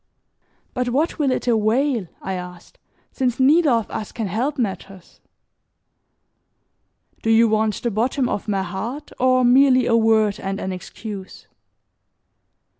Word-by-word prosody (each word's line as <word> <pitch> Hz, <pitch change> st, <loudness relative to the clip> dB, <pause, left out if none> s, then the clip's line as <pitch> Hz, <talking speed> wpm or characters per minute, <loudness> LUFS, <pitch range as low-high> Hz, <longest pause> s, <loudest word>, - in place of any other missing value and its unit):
"But 250 Hz, -1 st, -1 dB
what 295 Hz, +8 st, -1 dB
will 285 Hz, -3 st, +2 dB
it 255 Hz, -, -2 dB
avail," 230 Hz, 0 st, +1 dB, 0.2 s
I 190 Hz, -, -3 dB
asked, 180 Hz, -1 st, -9 dB, 0.3 s
"since 250 Hz, -2 st, -1 dB
neither 300 Hz, +4 st, +4 dB
of 230 Hz, -4 st, +1 dB
us 215 Hz, -, -5 dB
can 225 Hz, -, -4 dB
help 240 Hz, +10 st, -2 dB
matters? 195 Hz, -5 st, -5 dB, 2.0 s
Do 225 Hz, -, -2 dB
you 225 Hz, +1 st, +5 dB
want 215 Hz, -1 st, 0 dB
the 235 Hz, -, 0 dB
bottom 245 Hz, +5 st, 0 dB
of 205 Hz, -, -3 dB
my 195 Hz, -2 st, 0 dB
heart 220 Hz, +11 st, -6 dB
or 255 Hz, 0 st, +3 dB
merely 255 Hz, +1 st, +5 dB
a 230 Hz, -, +2 dB
word 220 Hz, -2 st, +2 dB
and 195 Hz, +1 st, -4 dB
an 190 Hz, -, -4 dB
excuse?" 195 Hz, +1 st, -8 dB
225 Hz, 135 wpm, -21 LUFS, 200-255 Hz, 2.0 s, you